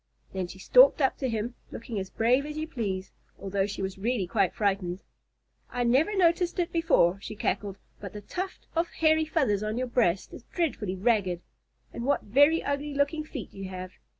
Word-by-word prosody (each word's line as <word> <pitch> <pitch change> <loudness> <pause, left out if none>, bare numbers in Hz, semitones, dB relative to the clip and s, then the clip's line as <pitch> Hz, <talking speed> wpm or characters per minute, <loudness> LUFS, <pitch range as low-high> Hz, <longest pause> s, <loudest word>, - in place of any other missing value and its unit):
Then 190 -2 -2
she 190 - -11
stalked - - +6
up 270 -2 +2
to 265 - -1
him, 225 +1 -2 0.2
looking 230 -2 -5
as 190 -1 -5
brave 245 +5 +2
as 300 0 -6
you 310 +1 -3
please, 195 -9 -3 0.3
although 195 0 -1
she 200 -1 -5
was 190 0 -4
really 225 -1 0
quite 190 0 +1
frightened. 195 -3 -1 0.7
"I 245 - -1
never 280 - +2
noticed 345 0 +3
it 350 -2 0
before," 195 - +3
she 215 - -7
cackled, 200 -1 -2 0.2
"but 200 -3 -7
the 210 - -8
tuft 370 - -5
of 335 +1 +2
hairy 315 0 +3
feathers 270 - +1
on 215 +1 -2
your 255 - 0
breast 225 -7 +1
is - - -9
dreadfully 230 - -1
ragged. 190 -4 +1 0.5
And 235 - -5
what 285 +3 +1
very 285 +9 +4
ugly 285 +1 -2
looking 285 +2 +1
feet 270 - -8
you 195 -1 -7
have! 185 0 -7
230 Hz, 190 wpm, -28 LUFS, 195-300 Hz, 0.7 s, stalked